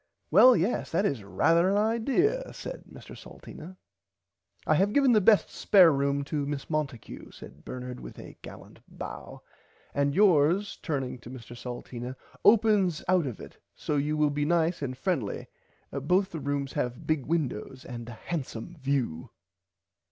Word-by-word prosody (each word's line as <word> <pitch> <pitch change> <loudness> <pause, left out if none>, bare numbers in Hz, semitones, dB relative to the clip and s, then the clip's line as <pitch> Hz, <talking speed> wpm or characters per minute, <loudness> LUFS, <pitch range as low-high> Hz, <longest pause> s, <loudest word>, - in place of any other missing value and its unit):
Well 255 -3 +8
yes 190 +9 -1
that 200 - +1
is 140 - -1
rarther 165 - +2
an 200 - +2
idear 270 - +1
said - - -8
Mr - - -12
Salteena. 180 +4 -12 0.9
I - - +3
have 195 +6 +2
given 275 -3 +4
the 215 -3 +5
best 210 +1 +4
spare 185 -5 +5
room 140 0 0
to 140 0 -3
Miss 145 +1 -5
Monticue 145 -6 -4
said 70 +3 -13
Bernard 125 0 -7
with - - -10
a - - -11
gallant - - -12
bow - - -9 0.5
and 140 0 0
yours 185 0 +3
turning 135 -5 -3
to 120 - -12
Mr 120 -1 -10
Salteena 125 +1 -7 0.3
opens 205 -6 +4
out 180 -4 +3
of 120 - -6
it - - -12
so 150 - -3
you 150 +2 0
will 150 -1 +2
be 145 0 -1
nice 165 +1 +1
and 130 -2 -4
friendly 135 - -2 0.5
both 180 +8 +1
the 165 - -5
rooms 140 -1 -3
have 125 0 -3
big 155 -4 -1
windows 135 -5 -3
and 120 -1 -7
a - - -7
handsome 150 +3 -6
view. 130 - -2
150 Hz, 160 wpm, -28 LUFS, 130-185 Hz, 0.9 s, Well